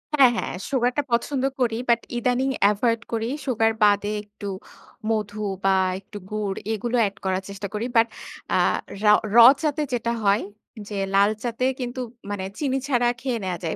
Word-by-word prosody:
হ্যাঁ, 265 -4 +7
হ্যাঁ - - -3 0.2
সুগারটা 255 +1 +1
পছন্দ 260 +3 0 0.2
করি, 230 -3 +1
বাট 235 0 +5 0.2
ইদানিং 250 +2 +1 0.2
এভয়েড 230 +2 0
করি। 230 +1 -1 0.2
সুগার 225 -3 +2
বাদে 205 0 +3
একটু 205 0 -10 0.6
মধু 215 -1 -2 0.3
বা 195 0 +4 0.2
একটু 205 +2 -11
গুড় 210 -2 -2 0.2
এগুলো 240 +3 -2
অ্যাড 200 -2 0
করার 190 0 0
চেষ্টা 200 0 -5
করি। 215 +3 -2
বাট 230 0 +5 0.5
আ - - +4 0.5
রাও 210 0 +7 0.2
র - - +6 0.2
চাতে 305 -1 0
যেটা 235 -1 0
হয়, 200 +2 +3 0.5
যে 205 - -4 0.2
লালচাতে 215 +5 +1
কিন্তু 250 +1 -4 0.3
মানে 195 -2 -3 0.2
চিনি 270 -3 0
ছাড়া 245 -3 +2
খেয়ে 255 -3 -1
নেয়া 180 -2 -2
যায়। 160 - -2
225 Hz, 160 wpm, -24 LUFS, 205-245 Hz, 0.6 s, হ্যাঁ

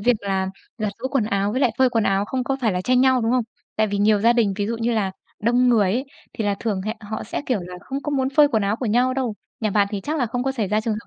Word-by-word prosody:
việc 245 +4 +4
là 190 -1 -1 0.3
giặt 210 -1 -1
giũ 260 - -3
quần 265 -6 +1
áo 200 0 0
với 255 - -1
lại 245 - +4
phơi 260 -1 +4
quần 225 -3 +1
áo 195 +1 +2
không 255 +3 -2
có 270 +1 -1
phải 225 -5 +1
là 180 - -1
tranh 250 +5 +2
nhau, 260 -1 +4
đúng 225 +1 0
không? 250 -2 +2 0.3
Tại 215 0 +3
vì 200 0 -2
nhiều 205 0 +4
gia 230 +2 +5
đình 225 -5 +2
ví 205 - -1
dụ 230 +1 -2
như 230 +1 0
là 205 -4 0 0.3
đông 245 +2 +3
người 210 -6 +4
ấy, 255 +4 -1 0.3
thì 220 - -3
là 205 -1 +1
thường 205 -5 -1
hẹ 215 +2 -3
họ 220 +1 -5
sẽ, 235 - -4
kiểu 245 -6 0
là, 180 +1 -8
không 275 +1 -5
có 295 - -3
muốn 265 -2 +1
phơi 290 +1 +5
quần 220 -6 +1
áo 200 +2 0
của 245 - -3
nhau 250 +4 +2
đâu. 250 -5 -1 0.3
Nhà 215 -2 0
bạn 200 0 +3
thì 205 - -3
chắc 300 +10 -3
là 245 - +1
không 245 +3 -2
có 270 0 0
xảy 220 -7 -2
ra 210 +1 +1
trường 220 0 -1
hợp 215 - -8
225 Hz, 320 wpm, -22 LUFS, 205-255 Hz, 0.3 s, gia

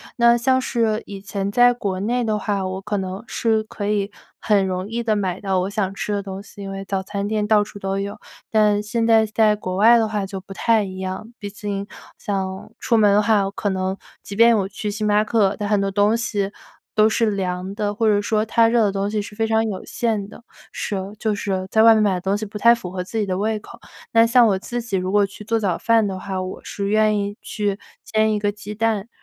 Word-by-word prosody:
那 235 0 +5
像 260 +2 +2
是 225 -3 0
以 195 -1 -8
前 200 0 -3
在 245 +2 +5
国 195 -6 -3
内 240 +4 0
的 215 -2 0
话， 200 -3 -1
我 185 +1 -4
可 210 +1 -3
能 190 +1 -4
是 220 -2 +1
可 205 -1 -6
以 205 -1 0 0.3
很 205 -3 +2
容 185 +1 -3
易 235 +1 -2
地 220 -2 +1
买 185 -1 -2
到 190 -2 0
我 185 +2 -1
想 195 -2 -2
吃 205 +1 -3
的 200 -1 -2
东 195 0 -6
西， 205 0 -13
因 195 0 -6
为 195 0 -6
早 190 -1 -2
餐 200 +1 -3
店 215 -1 0
到 210 -1 +4
处 205 0 -6
都 195 0 -2
有， 200 +1 -4 0.3
但 210 -1 +3
现 225 +2 -1
在 225 -1 +5
在 215 0 +3
国 185 -2 -4
外 230 +4 +6
的 225 -1 +2
话 210 -2 -2
就 195 0 -6
不 195 +1 -11
太 225 +1 +2
一 185 -1 -7
样。 190 +5 -5
毕 205 - -5
竟 200 -1 -5 0.3
像 190 0 -4
出 235 - +1
门 205 -2 +5
的 210 - +5
话， 210 -2 +3
我 195 - -3
可 205 0 -2
能 190 0 -2 0.3
即 200 - -8
便 230 +1 +6
我 195 -1 0
去 210 +1 -5
星 210 +1 -2
巴 210 +1 +3
克， 210 -3 +2
但 205 - -2
很 205 -1 +2
多 195 - 0
东 205 +3 +2
西 205 -4 -2 0.4
都 215 0 +4
是 220 -1 +1
凉 185 -1 -3
的， 205 -1 -2
或 225 0 +1
者 205 -1 +3
说 215 +1 0
它 225 +1 +4
热 230 -1 +3
的 200 - +2
东 200 +1 -1
西 210 -1 -1
是 205 +1 -9
非 225 0 0
常 220 0 +2
有 195 -3 -4
限 220 -4 -1
的。 235 - -14 0.3
是， 200 - -3 0.2
就 220 -2 0
是 190 -2 -2
在 220 - +4
外 225 0 +8
面 215 - +3
买 200 -2 +2
的 180 - -4
东 195 +2 0
西 215 - -4
不 210 +1 -7
太 235 +2 +6
符 180 -6 -8
合 180 -1 -3
自 225 +5 -6
己 210 - +1
的 185 -1 -2
胃 215 +1 -1
口。 235 +2 -13 0.3
那 230 0 +6
像 235 +1 +5
我 195 -3 +2
自 240 +4 -4
己 225 -4 -2
如 185 +1 -2
果 205 -1 +4
去 200 +2 -11
做 225 +1 0
早 190 -5 0
饭 225 -2 +3
的 190 -1 -4
话， 190 -1 -4
我 185 0 -6
是 200 -1 -4
愿 215 0 +3
意 200 +1 -4
去 205 -1 -2 0.2
煎 220 0 +1
一 210 - 0
个 205 0 0
鸡 210 0 -9
蛋， 220 -1 0
205 Hz, 270 characters per minute, -21 LUFS, 195-220 Hz, 0.4 s, 外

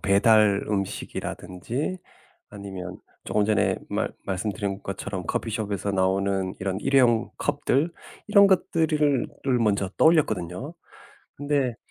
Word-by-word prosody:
배달 100 0 +4
음식이라든지 100 - -4 0.5
아니면 95 -3 -7 0.2
쪼금 105 - 0
전에 105 -1 +2
말 - - -2
말씀드린 100 0 -3
것처럼 95 -1 -5
커피숍에서 105 -3 -2
나오는 95 0 0
이런 95 +1 -2
일회용 125 -4 +3
컵들 145 +2 0 0.3
이런 200 -1 +6
것들을 155 -7 +2 0.2
을 125 -2 +3
먼저 100 -3 +1
떠올렸거든요. 150 - +2 0.6
근데 140 -4 0
105 Hz, 270 characters per minute, -25 LUFS, 95-140 Hz, 0.6 s, 이런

